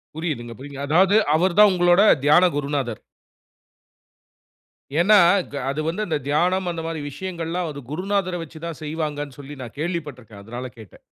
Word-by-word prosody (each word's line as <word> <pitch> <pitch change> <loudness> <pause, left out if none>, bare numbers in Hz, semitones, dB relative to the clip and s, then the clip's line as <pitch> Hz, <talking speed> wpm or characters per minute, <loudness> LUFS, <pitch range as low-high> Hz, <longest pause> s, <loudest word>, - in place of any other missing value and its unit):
புரியுதுங்க. 145 -8 -4
புரிங். 140 0 -9
அதாவது 185 +7 +4 0.2
அவர் 180 +3 +1
தான் 210 -1 +8
உங்களோட 175 +1 +4 0.2
தியான 175 +5 +6
குருநாதர். 140 -5 -2 2.0
ஏன்னா. 210 +5 +6 0.4
க - - -5
அது 145 +3 -2
வந்து 170 +6 -2
அந்த 160 -3 0
தியானம் 180 +5 +1
அந்த 165 -1 -5
மாதிரி 165 -1 -4
விஷயங்கள்லாம் 175 0 -4
அது 145 - -8
குருநாதர 185 +2 -1
வச்சு 160 0 -12
தான் 165 -3 -6
செய்வாங்கன்னு 150 -3 -4
சொல்லி 145 +1 -9
நான் 120 +2 -11
கேள்விப்பட்டிருக்கிறேன். 145 - -5
அதனால 120 +3 -6
கேட்டேன். 110 -5 -14
160 Hz, 145 wpm, -22 LUFS, 140-175 Hz, 2.0 s, தான்